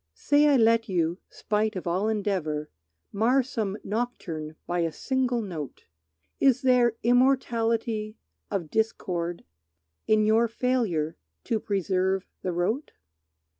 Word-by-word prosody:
Say 290 +1 +3
I 285 -2 +5
let 230 -1 +3
you, 170 -1 0
spite 215 0 -1
of 185 - -5
all 185 +5 0
endeavor, 180 -8 -2 0.4
Mar 240 +6 +3
some 215 -5 -3
nocturne 175 -9 -4
by 175 0 -1
a 165 -1 0
single 255 - -1
note; 160 - -7 0.6
Is 270 0 +3
there 250 -3 +4
immortality 230 -3 +1 0.3
of 180 -7 -3
discord 175 -6 -1 0.6
In 215 0 +4
your 225 +2 +4
failure 225 -10 -1 0.3
to 225 - 0
preserve 190 -2 0 0.2
the 185 - -2
rote? 185 - -1
215 Hz, 120 wpm, -27 LUFS, 180-235 Hz, 0.6 s, I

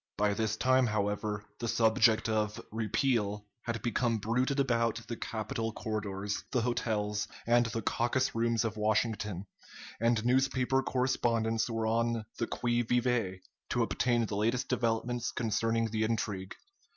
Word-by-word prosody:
By 105 0 +2
this 110 +1 -1
time, 130 0 +4
however, 105 0 -1
the 120 - -2
subject 110 0 +4
of 105 -1 0
"repeal" 105 -1 0 0.2
had 115 -1 -4
become 120 0 +1
bruited 125 +6 0
about 115 -4 +2
the 115 - -3
Capitol 115 0 -3
corridors, 105 -2 -3
the 125 - +2
hotels, 105 -3 -1 0.2
and 120 0 +4
the 115 -1 -3
caucus 120 +4 +1
rooms 115 0 +1
of 110 -1 -3
Washington, 105 -3 0 0.5
and 115 0 +2
newspaper 130 +1 +2
correspondents 115 -4 +1
were 115 -1 -1
on 115 0 +1
the 115 - 0
qui 120 0 0
vive 120 -6 0 0.3
to - - +2
obtain 120 -2 +1
the 105 - -4
latest 115 +4 +1
developments 120 0 0
concerning 115 0 0
the 110 -1 -1
intrigue. 105 -4 -2
115 Hz, 140 wpm, -31 LUFS, 105-120 Hz, 0.5 s, time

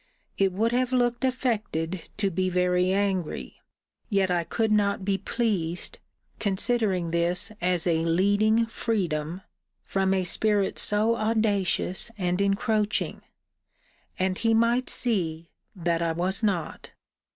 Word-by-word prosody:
It 195 -1 +2
would 220 +5 0
have 250 +1 +1
looked 245 -1 +1
affected 205 -10 -2
to 200 -2 0
be 185 +1 0
very 180 0 +2
angry; 190 - -1 0.5
yet 195 -2 +2
I 175 -1 +1
could 220 +5 -1
not 200 -2 +1
be 195 -1 0
pleased, 190 -8 -2 0.4
considering 195 -4 0
this 175 +5 0
as 180 -1 +1
a 165 -2 +2
leading 205 +7 +3
freedom, 180 -7 -2 0.4
from 190 -1 0
a 190 - +1
spirit 205 +2 +1
so 215 +3 +2
audacious 215 -3 0
and 180 0 0
encroaching: 210 +1 0 1.0
and 185 0 -1
he 225 -1 +2
might 235 +3 +2
see, 170 -8 0 0.2
that 170 -2 -1
I 165 -1 0
was 185 +5 0
not. 190 -7 -2
195 Hz, 125 wpm, -26 LUFS, 180-220 Hz, 1.0 s, leading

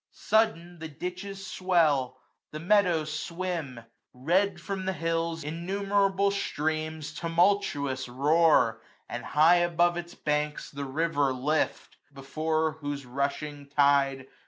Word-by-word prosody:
335 220 -2 +2
Sudden, 175 0 -15
the 160 - -6
ditches 185 +5 -6
swell; 155 -10 +1 0.3
the 155 - -7
meadows 170 -4 +2
swim. 165 -5 -4 0.3
Red, 175 +8 +1
from 190 +2 -5
the 190 - 0
hills, 165 0 -2
innumerable 195 +4 0
streams 155 -4 -3
Tumultuous 165 -7 0
roar; 140 -4 +3 0.3
and 120 - -5
high 160 +4 +5
above 175 0 +2
its 175 0 -7
banks 150 0 -2
The 140 0 -5
river 145 0 0
lift; 140 +5 -1
before 155 +3 -2
whose 145 -1 -4
rushing 140 +2 -3
tide. 140 -2 +2
160 Hz, 115 wpm, -28 LUFS, 145-175 Hz, 0.3 s, high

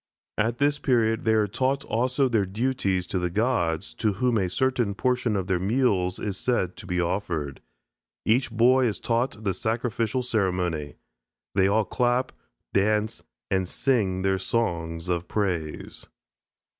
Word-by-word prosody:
At 115 +3 +1
this 145 +1 +2
period 115 -5 +1
they 110 0 +4
are 110 -1 +3
taught 130 +7 -1
also 125 +4 +1
their 110 -6 +1
duties 100 -4 0
to 95 - -2
the 90 0 -1
gods, 85 - 0
to 105 - +2
whom 120 +2 +1
a 95 -2 0
certain 125 -2 0
portion 125 -1 +1
of 95 -2 -1
their 95 -2 0
meals 95 -3 +1
is 100 -3 -4
said 105 -8 0
to - - -9
be 90 -1 -1
offered. 85 -6 -2 0.6
Each 120 +4 +2
boy 125 +3 +4
is 105 - -2
taught 115 -1 -1
the 95 -2 0
sacrificial 115 +3 -1
ceremony; 90 -9 -1 0.6
they 95 -1 +4
all 105 +2 +2
clap, 125 +3 +1 0.4
dance, 105 +2 +1 0.3
and 95 -2 +1
sing 100 -9 +1
their 95 0 +1
song 85 -6 -1
of 85 -1 -1
praise. 90 -7 -3
105 Hz, 150 wpm, -26 LUFS, 95-120 Hz, 0.6 s, they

